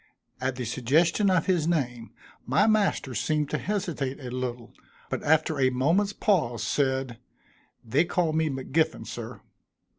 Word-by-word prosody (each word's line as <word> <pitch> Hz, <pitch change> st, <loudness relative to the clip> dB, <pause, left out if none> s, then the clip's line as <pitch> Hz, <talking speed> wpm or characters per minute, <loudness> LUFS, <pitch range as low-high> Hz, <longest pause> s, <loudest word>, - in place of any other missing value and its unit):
At 130 Hz, 0 st, -1 dB
the 125 Hz, -1 st, -4 dB
suggestion 155 Hz, -, +2 dB
of 185 Hz, -3 st, +2 dB
his 175 Hz, -5 st, +1 dB
name, 125 Hz, -9 st, -1 dB, 0.4 s
my -, -, +3 dB
master 210 Hz, -, +1 dB
seemed 150 Hz, +2 st, -1 dB
to -, -, 0 dB
hesitate 170 Hz, -10 st, -3 dB
a 125 Hz, -3 st, -7 dB
little, 125 Hz, -2 st, -5 dB, 0.4 s
but -, -, -2 dB
after 155 Hz, -1 st, +2 dB
a 130 Hz, -1 st, +4 dB
moment's 165 Hz, +11 st, +1 dB
pause, 120 Hz, -, 0 dB
said, 130 Hz, -1 st, -1 dB, 0.7 s
"They 135 Hz, +9 st, +2 dB
call 170 Hz, -2 st, 0 dB
me 160 Hz, 0 st, +1 dB
M'Giffin, 150 Hz, +4 st, -1 dB
sir." -, -, -7 dB
145 Hz, 145 wpm, -27 LUFS, 130-170 Hz, 0.7 s, a